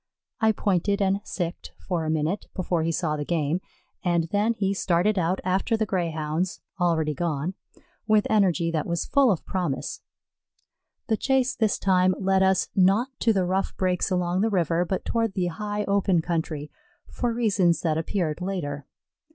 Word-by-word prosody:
I 220 0 +4
pointed 200 -1 0
and 195 0 +1
"sic 175 -2 -3
ed" - - -9
for 175 -4 -3
a - - -1
minute 160 +5 -1
before 180 -3 0
he 165 +1 0
saw 160 -2 -1
the 150 - -3
game, 160 +2 0 0.4
and 175 -3 +2
then 210 +3 +2
he 195 -2 0
started 190 +2 +1
out 180 +2 0
after 190 +5 +1
the 220 - +1
Greyhounds, 170 -2 -2 0.2
already 160 -3 +1
gone, 165 +1 -2 0.5
with 215 -1 +4
energy 185 -6 +2
that 155 -2 -1
was 170 0 -1
full 275 -4 +4
of 180 - -2
promise. 175 -8 -3 1.0
The 220 -3 0
chase 265 +1 +1
this 220 -3 +1
time 185 -1 +3
led 190 -1 +2
us, 190 -1 +3
not 195 +7 +4
to 230 - +3
the 190 -4 +1
rough 190 +2 -1
brakes 185 -1 0
along 180 0 0
the 225 - +2
river, 175 -3 +1
but 185 +2 -3
toward 225 -3 0
the 185 - 0
high 210 +3 -3
open 200 -3 +2
country, 160 -3 -3 0.4
for 245 - -1
reasons 205 -7 +2
that 160 -2 0
appeared 165 -1 -2
later. 150 -7 -4
185 Hz, 170 wpm, -25 LUFS, 165-200 Hz, 1.0 s, I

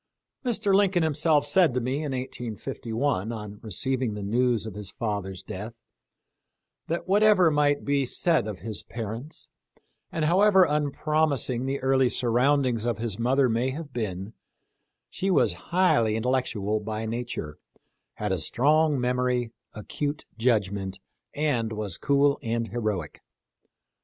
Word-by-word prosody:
Mr. 225 -5 0
Lincoln 195 -3 +3
himself 155 -1 +2
said 155 -2 +3
to - - +2
me 130 +3 -1
in 150 -2 -3
185 125 -1 -5 0.2
1, 115 -5 0
on 105 -2 -7
receiving 120 +3 -1
the 105 - -5
news 120 +2 +1
of 110 - -6
his 105 -1 -6
father's 100 -5 -4
death, 105 +5 -7 1.1
that 170 +3 -3
whatever 200 -3 +5
might 145 -1 +2
be 140 -1 +2
said 155 - +1
of 105 -4 -6
his 110 -3 -4
parents, 115 +7 -6 0.6
and 160 -2 -1
however 190 +3 +5
unpromising 145 -3 0
the 140 +1 -1
early 130 -1 +3
surroundings 125 0 +2
of 120 -1 -1
his 110 -3 -4
mother 130 +3 +3
may 120 +2 0
have 145 0 -7
been, 105 -2 -4 0.8
she 195 - -2
was 115 - +4 0.2
highly 170 -12 +3
intellectual 110 -3 0
by 110 +1 -4
nature, 115 -10 -5 0.6
had 105 -2 -3
a 95 - 0
strong 150 - +3
memory, 125 -1 0 0.2
acute 145 +7 -4
judgment, 100 -5 0 0.4
and 130 -7 0
was 105 -4 -4
cool 140 0 +3
and 115 0 -2
heroic. 105 -9 -3
125 Hz, 135 wpm, -26 LUFS, 110-145 Hz, 1.1 s, whatever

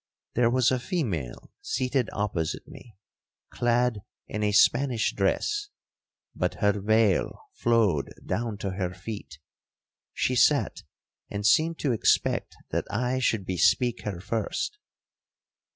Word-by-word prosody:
There 120 0 +3
was 125 0 +3
a 130 - +1
female 105 - -3
seated 130 -2 -1
opposite 95 -6 -2
me, 110 -6 -14 0.5
clad 120 -2 +1 0.3
in 105 - -4
a 105 -1 +2
Spanish 120 +3 +3
dress, 415 - 0 0.6
but - - -1
her 105 -1 +1
veil 110 -1 +3 0.2
flowed 110 -11 +2 0.2
down 115 -2 -2
to 95 - -1
her 95 -1 -3
feet. 90 -6 -8 0.7
She - - 0
sat, - - +3 0.5
and 100 0 -4
seemed 160 +9 +4
to 140 - +1
expect 115 - +1 0.2
that - - -1
I 125 +4 0
should 110 -6 0
bespeak 105 +7 +2
her 100 -5 -4
first. 115 - -3
110 Hz, 120 wpm, -27 LUFS, 100-125 Hz, 0.7 s, seemed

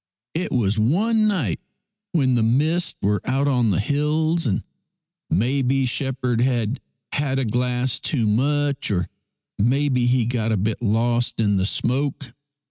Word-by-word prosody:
" - - -70
It 170 +3 -2
was 110 -3 +1
one 215 - +2
night 155 - 0 0.5
when 135 -6 +2
the 120 - +2
mists 150 +10 +1
were 100 -1 +1
out 135 +2 0
on 125 -5 +2
the 90 - +1
hills, 150 +6 0
and 95 - -1 0.7
maybe 130 +4 +1
shepherd 125 -2 -1
had 120 -1 0 0.3
had 140 -2 -1
a 135 - 0
glass 125 +2 0
too 125 -7 0
much, 140 +5 0
or 90 -3 -1 0.5
maybe 125 +2 +2
he 125 -1 +2
got 115 -2 -1
a 110 - +1
bit 105 +4 -2
lost 120 +2 0
in 100 -3 +2
the 95 +1 +1
smoke. 135 +3 -1
125 Hz, 150 wpm, -22 LUFS, 115-145 Hz, 0.7 s, one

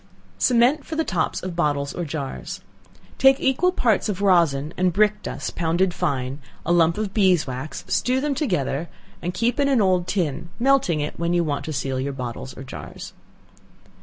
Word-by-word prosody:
Cement 255 +4 +3
for 320 - -6
the 320 - +1
Tops 175 - -1
of 185 -2 -4
Bottles 145 -4 0
or 175 - -3
Jars. 145 -3 -5 0.6
Take 270 +1 +6
equal 270 +8 +2
parts 225 - +1
of 195 -2 -2
rosin 165 -6 +3
and 185 0 +2
brick 210 +3 +2
dust - - -5
pounded 175 +2 +1
fine; 140 -6 -2 0.3
a 170 - 0
lump 170 0 +4
of 210 -2 -3
beeswax; 155 - +1
stew 255 +1 +1
them 290 +1 0
together, 170 - -1 0.3
and 175 - -2
keep 235 +8 0
in 280 - +3
an 270 -3 +3
old 185 -3 +2
tin, 170 -4 -2
melting 250 - +2
it 150 - -4
when 170 +1 0
you 175 - +3
want 145 -3 -2
to 160 - -4
seal 135 -2 -2
your 140 +1 -2
bottles 130 0 -6
or 135 - -7
jars. 130 - -9
175 Hz, 180 wpm, -23 LUFS, 145-215 Hz, 0.6 s, Take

